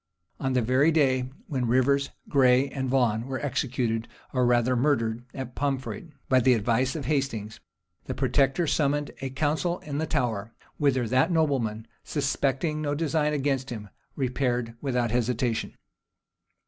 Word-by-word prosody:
On 130 Hz, -1 st, -1 dB
the 125 Hz, -2 st, +2 dB
very 130 Hz, +7 st, +3 dB
day 130 Hz, -5 st, +2 dB, 0.2 s
when 135 Hz, -, -2 dB
Rivers, 140 Hz, +3 st, +2 dB, 0.2 s
Gray, 130 Hz, 0 st, +4 dB
and 130 Hz, -2 st, -3 dB
Vaughan 120 Hz, -3 st, +1 dB
were 135 Hz, -1 st, -3 dB
executed, 125 Hz, -4 st, -1 dB, 0.3 s
or 125 Hz, -2 st, +2 dB
rather 120 Hz, +1 st, +3 dB
murdered, 120 Hz, -3 st, +1 dB
at 130 Hz, -2 st, -6 dB
Poinfret 140 Hz, +6 st, -3 dB, 0.2 s
by 130 Hz, -, +4 dB
the 125 Hz, 0 st, +4 dB
advice 120 Hz, +4 st, +1 dB
of 150 Hz, -5 st, -4 dB
Hastings, 120 Hz, -7 st, -2 dB, 0.5 s
the -, -, -4 dB
protector 135 Hz, +5 st, +2 dB
summoned 145 Hz, -1 st, +1 dB
a 135 Hz, -, -2 dB
council 155 Hz, +6 st, 0 dB
in 145 Hz, -1 st, -4 dB
the 160 Hz, -, -1 dB
Tower; 115 Hz, -6 st, -1 dB, 0.2 s
whither 130 Hz, -5 st, +2 dB
that 130 Hz, +8 st, +3 dB
nobleman, 130 Hz, -10 st, 0 dB, 0.2 s
suspecting 145 Hz, +1 st, -1 dB
no 145 Hz, -1 st, -1 dB
design 150 Hz, -1 st, +1 dB
against 135 Hz, -2 st, 0 dB
him, 105 Hz, -4 st, -6 dB, 0.3 s
repaired 125 Hz, -3 st, -1 dB
without 125 Hz, -4 st, 0 dB
hesitation. 120 Hz, -1 st, -1 dB
130 Hz, 145 wpm, -27 LUFS, 120-145 Hz, 0.5 s, Gray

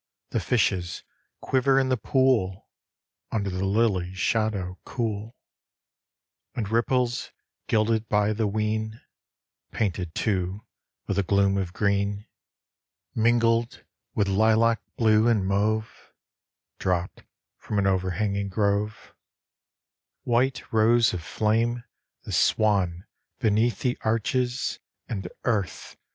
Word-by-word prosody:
The -, -, 0 dB
fishes 95 Hz, -7 st, 0 dB, 0.4 s
quiver 135 Hz, +1 st, +2 dB
in 130 Hz, -1 st, +1 dB
the 130 Hz, -, +3 dB
pool 120 Hz, -6 st, +1 dB, 0.6 s
Under 100 Hz, -3 st, -1 dB
the 95 Hz, +1 st, -2 dB
lily 95 Hz, -3 st, +1 dB
shadow 100 Hz, -3 st, -1 dB
cool, 110 Hz, -1 st, -4 dB, 1.2 s
And 110 Hz, -4 st, -2 dB
ripples 120 Hz, +1 st, 0 dB, 0.4 s
gilded 110 Hz, 0 st, +1 dB
by 105 Hz, 0 st, +2 dB
the 110 Hz, 0 st, 0 dB
whin, 110 Hz, +1 st, -2 dB, 0.7 s
Painted, 90 Hz, -5 st, -2 dB
too, 95 Hz, -1 st, -1 dB, 0.4 s
with 100 Hz, -1 st, -1 dB
a -, -, +5 dB
gloom 100 Hz, +1 st, +2 dB
of 95 Hz, -3 st, -2 dB
green, 100 Hz, +1 st, 0 dB, 0.9 s
Mingled 115 Hz, +1 st, +2 dB, 0.3 s
with 100 Hz, -2 st, +2 dB
lilac 110 Hz, +3 st, +3 dB, 0.2 s
blue 110 Hz, -1 st, +4 dB
and 110 Hz, -5 st, +2 dB
mauve, 110 Hz, +3 st, -1 dB, 0.7 s
Dropped 90 Hz, -1 st, -2 dB, 0.4 s
from 105 Hz, -, -4 dB
an 100 Hz, -, +2 dB
overhanging 100 Hz, +2 st, 0 dB
grove; 100 Hz, +2 st, -1 dB, 1.1 s
White 125 Hz, +2 st, +1 dB
rose 115 Hz, +1 st, +4 dB
of 90 Hz, -, -3 dB
flame 115 Hz, +7 st, 0 dB, 0.4 s
the -, -, -7 dB
swan 95 Hz, -4 st, +2 dB, 0.3 s
beneath 115 Hz, 0 st, +1 dB
the 125 Hz, -2 st, 0 dB
arche 110 Hz, +2 st, 0 dB
s 125 Hz, +1 st, -3 dB, 0.3 s
And, 95 Hz, -5 st, -4 dB, 0.2 s
Earth 105 Hz, -6 st, -2 dB
110 Hz, 110 wpm, -26 LUFS, 100-115 Hz, 1.2 s, a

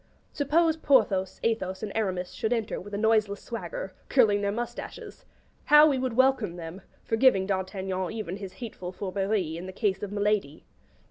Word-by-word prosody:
'Suppose 320 Hz, +3 st, +2 dB
Perthos, 205 Hz, -11 st, +2 dB
Athos, 190 Hz, -4 st, -1 dB
and 210 Hz, -, -3 dB
Aramis 185 Hz, -5 st, -2 dB
should 220 Hz, -, -2 dB
enter 225 Hz, -3 st, -1 dB
with 205 Hz, -, -10 dB
a -, -, -1 dB
noiseless 215 Hz, -2 st, +2 dB
swagger, 195 Hz, -4 st, -6 dB, 0.2 s
curling 215 Hz, -6 st, +4 dB
their 200 Hz, 0 st, 0 dB
moustaches.' 235 Hz, +3 st, -6 dB, 0.4 s
How 300 Hz, +1 st, +8 dB
we 275 Hz, -4 st, +1 dB
would 255 Hz, -2 st, -1 dB
welcome 255 Hz, -7 st, +2 dB
them, 170 Hz, +2 st, -8 dB, 0.2 s
forgiving 225 Hz, -4 st, +3 dB
D'Artagnan 190 Hz, -1 st, -2 dB
even 210 Hz, -5 st, -5 dB
his 195 Hz, -2 st, -8 dB
hateful 205 Hz, -7 st, -7 dB
fourberie 190 Hz, -3 st, -2 dB
in 180 Hz, +2 st, -7 dB
the -, -, -6 dB
case 195 Hz, 0 st, -1 dB
of 205 Hz, -1 st, -5 dB
Milady. 205 Hz, -7 st, -1 dB
205 Hz, 160 wpm, -27 LUFS, 190-230 Hz, 0.4 s, How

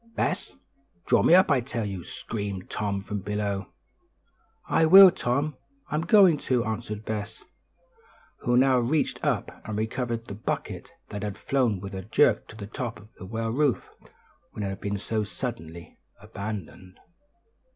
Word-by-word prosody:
"Bess! 190 Hz, -, -1 dB, 0.5 s
draw -, -, +4 dB
me 170 Hz, -, +6 dB
up, 185 Hz, -3 st, +5 dB
I 135 Hz, -3 st, +3 dB
tell 115 Hz, -2 st, -4 dB
you!" 95 Hz, -4 st, -5 dB
screamed 100 Hz, -2 st, -6 dB
Tom 100 Hz, -2 st, -2 dB
from 105 Hz, 0 st, -4 dB
below. 100 Hz, -1 st, -2 dB, 1.0 s
"I 160 Hz, -, +3 dB
will, 190 Hz, +2 st, +10 dB
Tom; 140 Hz, +2 st, -1 dB, 0.3 s
I'm 150 Hz, -, 0 dB
going 175 Hz, -3 st, +5 dB
to," 125 Hz, -4 st, 0 dB
answered 110 Hz, -1 st, -4 dB
Bess, 105 Hz, -2 st, -5 dB, 1.0 s
who 120 Hz, 0 st, +1 dB
now 130 Hz, 0 st, +5 dB
reached 140 Hz, +6 st, 0 dB
up -, -, -1 dB
and 110 Hz, -1 st, -5 dB
recovered 115 Hz, +1 st, -2 dB
the 100 Hz, -, -7 dB
bucket, 105 Hz, -, -4 dB, 0.2 s
that 105 Hz, -, -5 dB
had 105 Hz, -1 st, -4 dB
flown 125 Hz, -8 st, 0 dB
with 100 Hz, +1 st, -8 dB
a 95 Hz, -, -4 dB
jerk -, -, +2 dB
to -, -, -12 dB
the 105 Hz, -2 st, -7 dB
top 115 Hz, +3 st, -5 dB
of 105 Hz, +2 st, -18 dB
the 95 Hz, -, -8 dB
well 115 Hz, +2 st, -2 dB
roof 140 Hz, 0 st, 0 dB, 0.6 s
when 105 Hz, -, -5 dB
it 100 Hz, -, -2 dB
had 95 Hz, -, -6 dB
been 100 Hz, 0 st, -2 dB
so 110 Hz, +2 st, -2 dB
suddenly 85 Hz, -8 st, -7 dB, 0.2 s
abandoned. 95 Hz, -2 st, -7 dB
110 Hz, 160 wpm, -26 LUFS, 100-130 Hz, 1.0 s, will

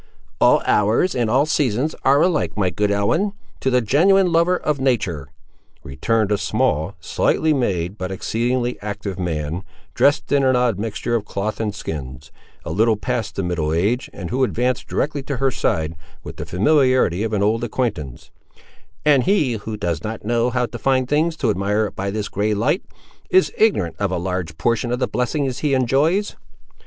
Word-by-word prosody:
"All -, -, +4 dB
hours 110 Hz, -, +2 dB
and 120 Hz, -3 st, 0 dB
all 135 Hz, +6 st, +3 dB
seasons 145 Hz, -1 st, 0 dB
are 140 Hz, +2 st, +4 dB
alike, 175 Hz, -10 st, 0 dB
my 95 Hz, -3 st, +1 dB
good 105 Hz, +4 st, 0 dB
Ellen, 130 Hz, -, +1 dB, 0.3 s
to 130 Hz, -, 0 dB
the 125 Hz, -1 st, +3 dB
genuine 180 Hz, -, +3 dB
lover 170 Hz, +2 st, +3 dB
of 150 Hz, -4 st, -1 dB
nature,"—returned 95 Hz, -, -2 dB
a 105 Hz, -, +2 dB
small, 100 Hz, -, 0 dB
slightly 155 Hz, -1 st, +1 dB
made, 100 Hz, -, -1 dB
but 95 Hz, 0 st, -4 dB
exceedingly 120 Hz, +5 st, -1 dB
active 100 Hz, -2 st, -5 dB
man, 80 Hz, -1 st, -2 dB, 0.3 s
dressed 145 Hz, +1 st, +2 dB
in 140 Hz, -1 st, +3 dB
an 130 Hz, -1 st, +3 dB
odd 125 Hz, -5 st, +1 dB
mixture 110 Hz, +2 st, -3 dB
of 115 Hz, -3 st, 0 dB
cloth 105 Hz, +1 st, -3 dB
and 105 Hz, -2 st, -2 dB
skins, 70 Hz, -8 st, -7 dB, 0.3 s
a -, -, -4 dB
little 110 Hz, +5 st, +2 dB
past 120 Hz, 0 st, -3 dB
the 100 Hz, -, -2 dB
middle 85 Hz, -3 st, -1 dB
age, 100 Hz, +10 st, 0 dB
and 90 Hz, -3 st, -7 dB
who 130 Hz, +2 st, +1 dB
advanced 125 Hz, 0 st, 0 dB
directly 145 Hz, -1 st, -1 dB
to 135 Hz, 0 st, -4 dB
her 135 Hz, +1 st, +1 dB
side, 80 Hz, -7 st, -1 dB, 0.3 s
with -, -, -9 dB
the -, -, -6 dB
familiarity 130 Hz, -, +2 dB
of 110 Hz, 0 st, -1 dB
an 105 Hz, -2 st, +1 dB
old 110 Hz, +3 st, +1 dB
acquaintance; 105 Hz, -, -3 dB, 0.7 s
"and 140 Hz, -4 st, +4 dB
he 170 Hz, -11 st, +2 dB
who 110 Hz, 0 st, -5 dB
does 85 Hz, -6 st, -2 dB
not 110 Hz, -1 st, -5 dB
know 120 Hz, +2 st, +1 dB
how 125 Hz, 0 st, 0 dB
to 120 Hz, 0 st, -8 dB
find 130 Hz, -2 st, +1 dB
things 160 Hz, +2 st, +1 dB
to 120 Hz, -8 st, +1 dB
admire 105 Hz, +2 st, 0 dB
by 95 Hz, +1 st, -4 dB
this 105 Hz, 0 st, -3 dB
grey 105 Hz, +2 st, -1 dB
light, 130 Hz, -, 0 dB, 0.5 s
is 375 Hz, 0 st, +3 dB
ignorant 195 Hz, -, +2 dB
of 100 Hz, -1 st, 0 dB
a 90 Hz, -, 0 dB
large 90 Hz, -3 st, -3 dB
portion 120 Hz, +4 st, 0 dB
of 125 Hz, -, 0 dB
the 130 Hz, -, 0 dB
blessings 130 Hz, +1 st, -1 dB
he 145 Hz, -3 st, +1 dB
enjoys." 145 Hz, -, +1 dB
115 Hz, 180 wpm, -21 LUFS, 100-135 Hz, 0.7 s, All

